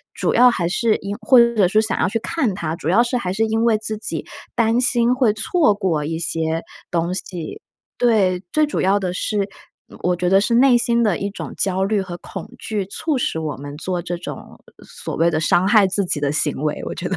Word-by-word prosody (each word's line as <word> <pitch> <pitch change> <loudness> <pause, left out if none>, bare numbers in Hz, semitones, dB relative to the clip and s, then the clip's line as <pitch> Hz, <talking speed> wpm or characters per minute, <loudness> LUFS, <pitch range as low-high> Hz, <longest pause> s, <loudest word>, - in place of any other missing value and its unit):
主 - - 0
要 250 0 +7
还 180 -8 -1
是 215 +5 +1
因 200 +1 -5
或 250 +4 +5
者 235 -5 +4
说 215 +4 +2
想 220 0 -1
要 - - +2
去 225 - -1
看 250 - -1
它， 160 -4 -3
主 165 -2 -4
要 215 +7 +5
是 245 +1 -2
还 185 -7 -3
是 205 +4 0
因 225 +1 0
为 225 -2 +3
自 215 0 -5
己 215 - -5 0.3
担 230 +1 +2
心 245 -1 +2
会 250 -5 +3
错 300 - +2
过 180 -7 -1
一 160 +1 -3
些 165 -1 -1 0.3
东 170 +1 0
西。 180 -3 -6 0.4
对， 195 -6 +2
最 310 0 +3
主 295 - -2
要 195 +2 +3
的 185 -2 -3
是 200 +1 -1 0.5
我 180 0 +1
觉 180 +1 -2
得 195 +1 +5
是 235 +3 +1
内 250 0 +6
心 235 0 +1
的 210 -6 +1
一 200 - -3
种 200 - -7
焦 190 -1 0
虑 200 +1 +1
和 180 -2 -6
恐 - - -9
惧 210 -3 -3
促 280 - -2
使 200 -9 -1
我 155 -3 -3
们 145 +1 -8
做 180 +2 -3
这 175 +1 -4
种 - - -9 0.2
所 - - -7
谓 165 +1 +3
的 155 -2 0
伤 175 +3 +2
害 210 -1 +5
自 200 +2 0
己 165 - -1
的 145 -1 0
行 150 0 0
为， 150 -1 -1
我 - - -4
觉 180 - -4
得 190 - -2
200 Hz, 250 characters per minute, -20 LUFS, 175-230 Hz, 0.5 s, 要